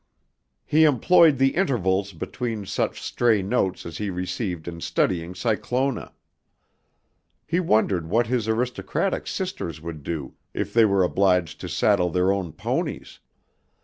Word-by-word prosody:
He 155 +2 +4
employed 155 +2 +5
the 135 +1 +4
intervals 100 - +1
between 110 +5 -4
such - - -2
stray 115 -5 +2
notes 95 -2 -1
as 85 -1 -7
he 105 -1 -2
received 90 -2 -4
in 85 -1 -6
studying 85 0 -1
Cyclona. 125 +5 -1 1.3
He 170 +3 0
wondered 105 - +1
what 115 +5 +2
his 115 -1 -1
aristocratic 125 +10 -1
sisters 185 - -4
would 80 -1 -7
do 75 -2 -5 0.2
if - - -3
they 115 -1 +6
were 100 -2 +3
obliged 90 -3 +1
to - - -5
saddle 90 0 +2
their 90 +3 +2
own 95 -4 -2
ponies. - - -4
100 Hz, 135 wpm, -24 LUFS, 90-125 Hz, 1.3 s, they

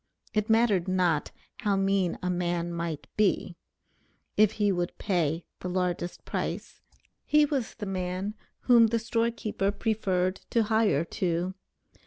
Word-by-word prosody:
"It 215 0 0
mattered 220 -5 +3
not, 180 -5 +1 0.3
how 205 -4 +1
mean 195 -2 +1
a 180 - 0
man 175 -1 -1
might 170 -3 -3
be," 195 -4 +1 0.8
if 215 -1 +5
he 205 -1 +2
would 175 -2 -2
pay 165 -4 0
the 180 - -4
largest 180 -1 -2
price, - - -4 0.4
he 300 0 +4
was 280 -5 -2
the 215 - -5
man 185 +1 -3 0.3
whom 235 -2 +6
the 230 +1 +1
store 230 +1 +1
keeper 215 -4 -2
preferred 195 -4 0
to 230 - +3
hire 215 -8 +2
to. 175 0 -1
195 Hz, 140 wpm, -28 LUFS, 175-220 Hz, 0.8 s, whom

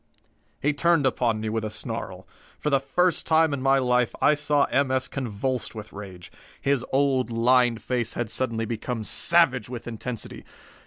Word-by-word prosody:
He 150 +2 +1
turned 165 0 +2
upon 120 -4 0
me 110 - -3
with 110 0 -2
a 110 - -3
snarl. - - -6 0.3
For 150 - -2
the 140 - +4
first 170 +6 0
time 160 -2 +3
in 140 - -3
my 135 +1 +3
life 125 -2 +1
I - - +4
saw 145 -1 +1
M. 140 0 +2
S. 130 0 0
convulsed 130 0 -3
with 105 -1 -9
rage. 95 -4 -10 0.3
His 140 -3 0
old, 135 -2 +1
lined 120 0 +2
face 120 -3 -2
had 120 -2 -3
suddenly 115 -1 -1
become 115 +1 -4
savage 130 -3 +3
with 120 -2 -7
intensity. 115 0 -6
125 Hz, 170 wpm, -25 LUFS, 115-140 Hz, 0.3 s, the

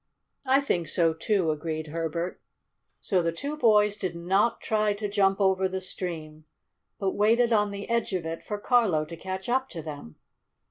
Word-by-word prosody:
"I 265 +2 +5
think 175 - -1
so, 165 +1 +2
too!" 175 0 +1
agreed 155 0 -4
Herbert. 165 +2 -3 0.6
So 185 -3 +1
the 165 0 0
two 280 - -4
boys 210 -7 +4
did 185 -4 -3
not 190 +7 +1
try 215 -1 +1
to 210 0 -3
jump 195 -1 +2
over 190 -1 +2
the 190 0 -3
stream, 160 -4 -5 0.5
but 195 -1 0
waited 230 +4 +3
on 210 -1 +3
the 200 0 -6
edge 235 -2 0
of 180 -3 -2
it 165 0 -4
for 210 - -4
Carlo 205 -9 +2
to 170 - -8
catch 190 +2 -6
up 260 +2 +1
to 165 -3 -7
them. 145 - -8
190 Hz, 180 wpm, -27 LUFS, 165-210 Hz, 0.6 s, I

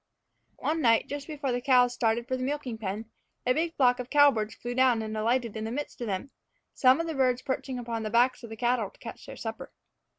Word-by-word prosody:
One 320 +1 -1
night, 230 -4 +4
just 285 0 -6
before 285 -4 -3
the 245 0 -1
cows 250 -1 +4
started 230 0 0
for 260 - -1
the 255 - -5
milking 260 -4 -3
pen, 215 +2 -5 0.3
a 250 - +4
big 325 +3 -1
flock 250 -2 +3
of 250 0 -5
cowbirds 275 -8 +4
flew 240 0 -5
down 250 -3 +3
and 220 0 -5
alighted 230 +1 0
in 220 - -4
the 220 - -3
midst 285 0 -5
of 240 - -2
them, 205 +7 -3 0.4
some 260 +2 +5
of 330 - -1
the 325 - -3
birds 255 -3 +1
perching 260 -1 -3
upon 230 -2 -4
the 215 - -3
backs 245 +3 +3
of 235 - -9
the 225 - -8
cattle 240 -3 +1
to - - -25
catch - - -9
their - - -8
supper. - - -6
245 Hz, 235 wpm, -28 LUFS, 225-265 Hz, 0.4 s, some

